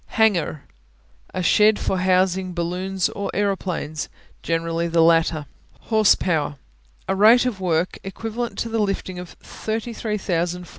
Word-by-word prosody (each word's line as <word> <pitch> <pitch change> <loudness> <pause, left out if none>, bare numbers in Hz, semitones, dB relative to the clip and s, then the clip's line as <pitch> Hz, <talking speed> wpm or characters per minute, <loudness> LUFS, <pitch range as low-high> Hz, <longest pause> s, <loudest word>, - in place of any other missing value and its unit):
Hangar 220 -6 +3
(hang'ar) 155 -1 -7 0.7
A 185 - -1
shed 210 +3 +5
for 190 - -1
housing 185 0 +1
balloons 180 +2 -1
or 200 - -4
aeroplanes, 185 -6 -2 0.3
generally 165 0 -1
the 165 -1 +3
latter. 165 -2 +3 0.3
Horsepower 180 -9 +2 0.5
A 190 - 0
rate 225 +5 +6
of 220 -7 -2
work 175 -1 0
equivalent 225 +4 -5
to 230 - -2
the 225 0 -1
lifting 195 -3 -2
of 180 -1 -10
33,000 210 -6 -3
ft. - - -16
185 Hz, 135 wpm, -22 LUFS, 170-210 Hz, 0.7 s, rate